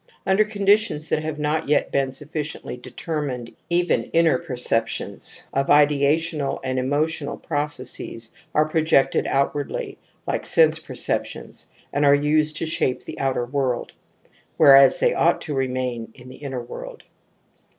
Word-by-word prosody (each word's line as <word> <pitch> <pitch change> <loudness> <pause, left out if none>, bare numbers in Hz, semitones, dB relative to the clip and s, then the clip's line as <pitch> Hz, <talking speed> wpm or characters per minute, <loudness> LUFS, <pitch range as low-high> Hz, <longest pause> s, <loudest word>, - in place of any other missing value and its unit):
) - - -36
Under 190 +2 +4
conditions 205 -6 +1
that 155 - +1
have 155 -1 -4
not 150 +1 -1
yet 150 - +2
been 135 -1 +1
sufficiently 150 +1 -6
determined 130 -1 -5
even 175 +1 +1
inner 165 -5 +4
perceptions 120 -3 -3
of 135 0 0
ideational 145 +1 +2
and 130 -1 -1
emotional 145 +5 -1
processes 140 -6 -5 0.2
are 155 0 +4
projected 155 -3 +2
outwardly, 140 +1 -2 0.3
like - - -2
sense 160 -1 +4
perceptions, - - -5 0.2
and 145 - +1
are 140 0 +6
used 150 +1 +1
to - - -2
shape 145 -5 -1
the - - -8
outer 135 -3 0
world, 130 -1 -2 0.6
whereas 135 -1 +7
they - - +3
ought - - +2
to 150 - -5
remain 130 -3 -2
in 125 -1 -13
the 130 - -11
inner 130 -4 -5
world. 120 - -9
145 Hz, 140 wpm, -23 LUFS, 130-155 Hz, 0.6 s, whereas